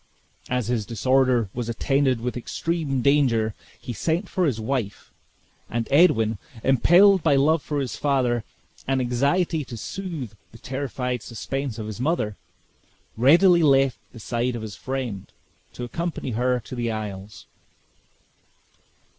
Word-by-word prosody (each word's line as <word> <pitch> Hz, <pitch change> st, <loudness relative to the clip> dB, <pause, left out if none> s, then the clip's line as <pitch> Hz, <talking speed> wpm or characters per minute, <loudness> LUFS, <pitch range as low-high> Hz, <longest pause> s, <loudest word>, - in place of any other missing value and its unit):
As 125 Hz, -2 st, 0 dB
his 115 Hz, -4 st, -1 dB
disorder 125 Hz, 0 st, +2 dB
was 120 Hz, -1 st, -4 dB
attended 130 Hz, +1 st, +1 dB
with 125 Hz, +1 st, -3 dB
extreme 140 Hz, +1 st, -2 dB
danger, 125 Hz, -7 st, +3 dB, 0.3 s
he 120 Hz, -, -6 dB
sent 165 Hz, -, -1 dB
for 185 Hz, -2 st, 0 dB
his 120 Hz, -6 st, -1 dB
wife; 110 Hz, -3 st, -3 dB, 0.6 s
and 115 Hz, -1 st, -2 dB
Edwin, 115 Hz, -, +4 dB, 0.2 s
impelled 180 Hz, -, +5 dB
by 150 Hz, -3 st, +3 dB
love 150 Hz, +3 st, +3 dB
for 145 Hz, 0 st, -3 dB
his 135 Hz, -3 st, -3 dB
father, 125 Hz, -5 st, +1 dB, 0.4 s
and 135 Hz, 0 st, +1 dB
anxiety 140 Hz, +7 st, +1 dB
to 120 Hz, -, -8 dB
soothe 165 Hz, -, -6 dB, 0.2 s
the 115 Hz, -, -13 dB
terrified 125 Hz, -2 st, -3 dB
suspense 130 Hz, +2 st, -4 dB
of 110 Hz, -, -5 dB
his 110 Hz, 0 st, -7 dB
mother, 130 Hz, -8 st, 0 dB, 0.8 s
readily 170 Hz, -, +5 dB
left 135 Hz, -4 st, +3 dB
the 115 Hz, -, -12 dB
side 120 Hz, +2 st, -2 dB
of 115 Hz, -, -5 dB
his 105 Hz, -3 st, -7 dB
friend, 120 Hz, -5 st, -5 dB, 0.4 s
to 125 Hz, -, -7 dB
accompany 160 Hz, +2 st, -4 dB
her 125 Hz, +2 st, +1 dB
to 115 Hz, -, -11 dB
the 120 Hz, -2 st, -2 dB
isles. 105 Hz, -2 st, -6 dB
125 Hz, 140 wpm, -24 LUFS, 115-145 Hz, 0.8 s, impelled